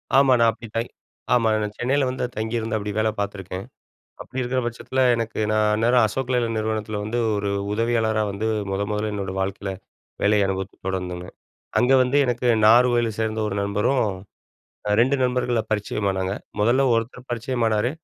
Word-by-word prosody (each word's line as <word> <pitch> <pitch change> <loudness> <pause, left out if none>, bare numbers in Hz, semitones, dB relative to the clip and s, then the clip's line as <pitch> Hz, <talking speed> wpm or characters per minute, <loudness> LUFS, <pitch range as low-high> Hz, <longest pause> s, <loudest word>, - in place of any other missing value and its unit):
ஆமா, 135 -1 +6
நான் 115 -1 +5
அப்டி 115 +1 -11
தை 115 - +1 0.5
ஆமா 120 -2 +3
நான் 105 -1 -3
சென்னையில 135 +3 +1
வந்து 130 0 -2
தங்கியிருந்து 110 0 -2
அப்டி 105 0 -4
வேல 110 0 +2
பார்த்துருக்கேன். 95 -2 -4 0.6
அப்டி 130 - -6
இருக்குற 130 +1 0
பட்சத்தில 120 +2 -2
எனக்கு 115 -1 -3
நான் 110 0 +3
அந்நேரம் 120 +2 +3
"அசோக் 130 +4 -3
லலைலாண்ட்" 115 -2 0
நிறுவனத்தில 110 -1 -2
வந்து 110 +3 -2 0.2
ஒரு 100 0 -1 0.2
உதவியாளரா 110 -1 +1
வந்து 100 +3 -3 0.2
முத 95 +1 -1
முதல்ல 105 +1 -1
என்னோடய 95 -2 -4
வாழ்க்கையில 95 +1 -2 0.5
வேலைய 105 -1 +3
அனுபவத்த 95 0 -4
தொடர்ந்தங்க. 90 -2 -3 0.5
அங்க 125 +2 +4
வந்து 130 +3 +1
எனக்கு 125 0 -1 0.2
நாகர்கோயிலில 120 +1 +5
சேர்ந்த 110 0 -1
ஒரு 100 - -3
நண்பரும் 105 +6 +1 0.9
அ - - +1
2 130 +4 +3
நண்பர்கள 125 -2 +1
பரிச்சயமானங்க 100 -3 -1 0.3
முதல்ல 120 +6 +3
ஒருத்தர் 120 +3 -3
பரிச்சயமானாரு 120 -2 0
110 Hz, 155 wpm, -23 LUFS, 105-120 Hz, 0.9 s, ஆமா